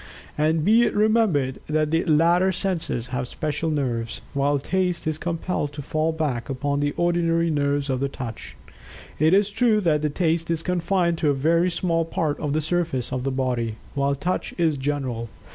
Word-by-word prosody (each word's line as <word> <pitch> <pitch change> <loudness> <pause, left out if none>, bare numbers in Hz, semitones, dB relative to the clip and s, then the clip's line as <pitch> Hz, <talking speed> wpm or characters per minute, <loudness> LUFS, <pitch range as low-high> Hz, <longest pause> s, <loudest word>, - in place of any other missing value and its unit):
And, 155 +1 +1
be 225 +3 +5
it 240 - +1
remembered, 205 - +2
that 155 0 +1
the 165 +1 +2
latter 170 +3 +4
senses 180 - -2
have 125 0 -2
special 155 +4 -2
nerves, 120 -6 -2
while 140 +1 +2
Taste 180 +4 -1
is 155 -1 -1
compelled 165 -3 -2
to 145 -1 -6
fall 155 +3 0
back 150 -6 -2
upon 140 +1 -1
the 145 0 -1
ordinary 170 -1 +2
nerves 145 -1 0
of 135 +1 -1
Touch. 120 -5 -7 0.6
It 160 +5 +5
is 205 +1 +2
true 225 0 +3
that 150 -4 +1
Taste 165 -2 0
is 165 -1 -1
confined 175 -1 0
to 150 - +2
a 140 - +2
very 165 +6 +2
small 170 -1 0
part 160 -2 -2
of 150 -2 -2
the 155 - +1
surface 160 -7 -1
of 130 -1 -2
the 135 - 0
body, 125 -4 -1 0.2
while 140 0 +1
Touch 180 +6 -3
is 165 -3 +2
general. 130 -5 -3
155 Hz, 180 wpm, -24 LUFS, 140-170 Hz, 0.6 s, be